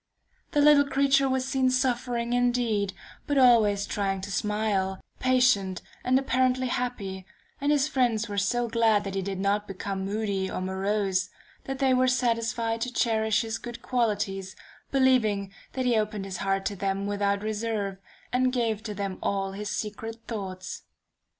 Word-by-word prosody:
The 295 Hz, -, +4 dB
little 290 Hz, -1 st, +6 dB
creature 275 Hz, 0 st, +3 dB
was 260 Hz, 0 st, 0 dB
seen 265 Hz, -1 st, +2 dB
suffering 245 Hz, -2 st, 0 dB
indeed, 240 Hz, -5 st, +1 dB, 0.3 s
but 285 Hz, -, +1 dB
always 220 Hz, -6 st, +5 dB
trying 195 Hz, -2 st, -1 dB
to 200 Hz, +1 st, -6 dB
smile, 200 Hz, -2 st, 0 dB, 0.2 s
patient 250 Hz, -8 st, +2 dB, 0.2 s
and 255 Hz, +1 st, +3 dB
apparently 255 Hz, -1 st, +1 dB
happy 205 Hz, -7 st, -3 dB, 0.4 s
and 285 Hz, +1 st, +2 dB
his 290 Hz, -1 st, +3 dB
friends 240 Hz, -6 st, +1 dB
were 205 Hz, -1 st, -1 dB
so 240 Hz, +4 st, +1 dB
glad 225 Hz, -2 st, +3 dB
that 195 Hz, -1 st, -5 dB
he 195 Hz, -, -1 dB
did 190 Hz, 0 st, -4 dB
not 205 Hz, +2 st, 0 dB
become 195 Hz, 0 st, -4 dB
moody 200 Hz, -1 st, -1 dB
or -, -, -3 dB
morose, 190 Hz, 0 st, 0 dB, 0.4 s
that 270 Hz, 0 st, -4 dB
they 265 Hz, -1 st, +3 dB
were 255 Hz, 0 st, +3 dB
satisfied 230 Hz, -2 st, 0 dB
to 250 Hz, -, -2 dB
cherish 220 Hz, -3 st, +2 dB
his 225 Hz, 0 st, -3 dB
good 240 Hz, -1 st, -8 dB
qualities, 205 Hz, -6 st, -1 dB, 0.4 s
believing 220 Hz, -8 st, +2 dB, 0.2 s
that 260 Hz, -1 st, -2 dB
he 245 Hz, -2 st, +3 dB
opened 210 Hz, -2 st, -1 dB
his 190 Hz, -2 st, -5 dB
heart 195 Hz, +1 st, -1 dB
to 205 Hz, -, -1 dB
them 195 Hz, +1 st, -2 dB
without 200 Hz, 0 st, 0 dB
reserve, 215 Hz, -2 st, -2 dB, 0.4 s
and 255 Hz, 0 st, +3 dB
gave 230 Hz, -4 st, 0 dB
to 215 Hz, -2 st, -6 dB
them 195 Hz, -1 st, -4 dB
all 195 Hz, -1 st, -1 dB
his 205 Hz, +2 st, -5 dB
secret 215 Hz, +2 st, -4 dB
thoughts. 190 Hz, -5 st, -5 dB
220 Hz, 160 wpm, -27 LUFS, 200-250 Hz, 0.4 s, little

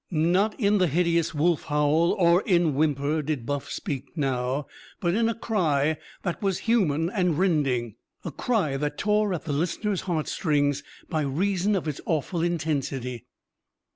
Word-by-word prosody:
Not 180 Hz, -, +1 dB
in 205 Hz, -2 st, +3 dB
the 180 Hz, -, +4 dB
hideous 170 Hz, +1 st, +1 dB
wolf 165 Hz, +2 st, +1 dB
howl 150 Hz, +3 st, +2 dB
or 175 Hz, 0 st, +4 dB
in 175 Hz, -7 st, +2 dB
whimper 150 Hz, +1 st, +1 dB
did 145 Hz, -5 st, -3 dB
Buff 145 Hz, 0 st, -3 dB
speak 140 Hz, +2 st, -5 dB
now, 135 Hz, 0 st, -1 dB, 0.3 s
but 175 Hz, -1 st, 0 dB
in 225 Hz, +2 st, +2 dB
a 230 Hz, -, -2 dB
cry 160 Hz, -10 st, +1 dB, 0.3 s
that 175 Hz, -3 st, -3 dB
was 195 Hz, -3 st, 0 dB
human 170 Hz, -10 st, +2 dB
and 180 Hz, -7 st, +1 dB
rending 135 Hz, -, +1 dB, 0.3 s
a 170 Hz, -, -3 dB
cry 170 Hz, -, 0 dB
that 150 Hz, +1 st, -2 dB
tore 210 Hz, 0 st, +1 dB
at 175 Hz, -4 st, -3 dB
the 150 Hz, -, -2 dB
listener's 180 Hz, +6 st, -1 dB
heartstrings 150 Hz, -3 st, 0 dB, 0.3 s
by 160 Hz, -3 st, -1 dB
reason 185 Hz, +8 st, 0 dB
of 175 Hz, -4 st, -2 dB
its 150 Hz, -2 st, -4 dB
awful 165 Hz, +1 st, -1 dB
intensity. 140 Hz, -8 st, -2 dB
160 Hz, 155 wpm, -26 LUFS, 145-185 Hz, 0.3 s, the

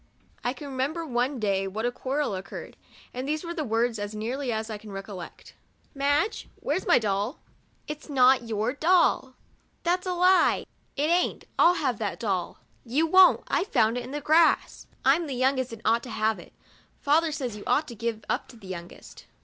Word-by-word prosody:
I 245 Hz, -, 0 dB
can 285 Hz, +2 st, -9 dB
remember 280 Hz, +5 st, -2 dB
one 250 Hz, 0 st, -1 dB
day 195 Hz, -2 st, 0 dB
what 215 Hz, +4 st, -3 dB
a 245 Hz, -, +1 dB
quarrel 270 Hz, 0 st, -2 dB
occur 190 Hz, 0 st, -6 dB
red, -, -, -15 dB, 0.4 s
and 255 Hz, +2 st, -4 dB
these 310 Hz, +2 st, -1 dB
were 340 Hz, 0 st, -4 dB
the 315 Hz, -, -2 dB
words, 230 Hz, -2 st, 0 dB
as 205 Hz, +1 st, -5 dB
nearly 245 Hz, +5 st, -3 dB
as 220 Hz, 0 st, -2 dB
I 215 Hz, -2 st, -6 dB
can 210 Hz, -1 st, -11 dB
recollect. 195 Hz, -3 st, -9 dB, 0.2 s
" -, -, -38 dB
Madge, 285 Hz, +8 st, 0 dB
where's 310 Hz, +7 st, -2 dB
my -, -, +6 dB
doll! 210 Hz, +4 st, -1 dB, 0.2 s
" -, -, -38 dB
" -, -, -39 dB
It 300 Hz, 0 st, -5 dB
's -, -, -15 dB
not 255 Hz, -3 st, +4 dB
your 220 Hz, +2 st, -1 dB
doll." 310 Hz, -5 st, +2 dB, 0.2 s
" -, -, -41 dB
That 360 Hz, +1 st, +1 dB
's -, -, -7 dB
a 365 Hz, -, 0 dB
lie." 365 Hz, +1 st, +4 dB, 0.2 s
" -, -, -41 dB
It 300 Hz, +4 st, +1 dB
aint, 355 Hz, +1 st, +1 dB
111 350 Hz, +1 st, +6 dB
have 250 Hz, -5 st, 0 dB
that 210 Hz, -3 st, -3 dB
doll." 190 Hz, -6 st, -2 dB
" -, -, -37 dB
You 320 Hz, -, +5 dB
won't, 370 Hz, +3 st, +6 dB
I -, -, +1 dB
found 225 Hz, -, +2 dB
it 245 Hz, -, -3 dB
in -, -, -9 dB
the 295 Hz, +2 st, -4 dB
grass." 320 Hz, +2 st, +3 dB
" -, -, -25 dB
I'm 305 Hz, +5 st, +4 dB
the 270 Hz, -, -4 dB
youngest 260 Hz, 0 st, +1 dB
and 225 Hz, -1 st, -9 dB
ought 230 Hz, +2 st, +3 dB
to 245 Hz, -, -10 dB
have 220 Hz, -1 st, 0 dB
it. -, -, -14 dB, 0.5 s
Father 310 Hz, +3 st, +2 dB
says 255 Hz, -7 st, -4 dB
you 210 Hz, -, -9 dB
ought 305 Hz, +1 st, +2 dB
to 240 Hz, -, -8 dB
give 225 Hz, -1 st, -4 dB
up -, -, -1 dB
to -, -, -14 dB
the 215 Hz, -, -15 dB
youngest." 175 Hz, -2 st, -9 dB
255 Hz, 225 wpm, -27 LUFS, 220-300 Hz, 0.5 s, my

